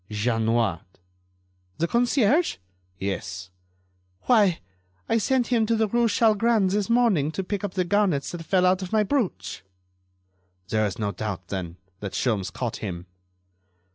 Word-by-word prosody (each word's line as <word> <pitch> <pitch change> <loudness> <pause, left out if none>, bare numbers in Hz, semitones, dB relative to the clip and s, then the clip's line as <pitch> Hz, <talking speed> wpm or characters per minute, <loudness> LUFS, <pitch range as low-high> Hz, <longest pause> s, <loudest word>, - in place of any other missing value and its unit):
"Jeanniot." 110 -3 0 1.0
"The 170 - 0
concierge?" 245 - +2 0.4
"Yes." 95 -1 -4 0.7
"Why, 205 -8 +4 0.5
I 230 - +2
sent 255 +2 +1
him 230 -3 +2
to 230 - +2
the 220 -1 +2
rue 235 +3 +2
Chalgrin 220 -2 +3
this 205 +2 -1
morning 225 - +3
to 195 - -2
pick 200 +2 -4
up 200 -2 -4
the 185 -1 +1
garnets 185 -7 +1
that 175 -2 -6
fell 185 +2 +2
out 185 +1 +3
of 185 - -6
my 215 -1 +3
brooch." 215 - -2 1.1
"There 110 -1 +2
is 95 - -6
no 105 -2 -1
doubt, 100 -2 -5
then, 90 -3 -5 0.2
that 100 -2 -6
Sholmes 105 -7 -1
caught 120 -3 -4
him." 90 -4 -6
180 Hz, 145 wpm, -25 LUFS, -, 1.1 s, Why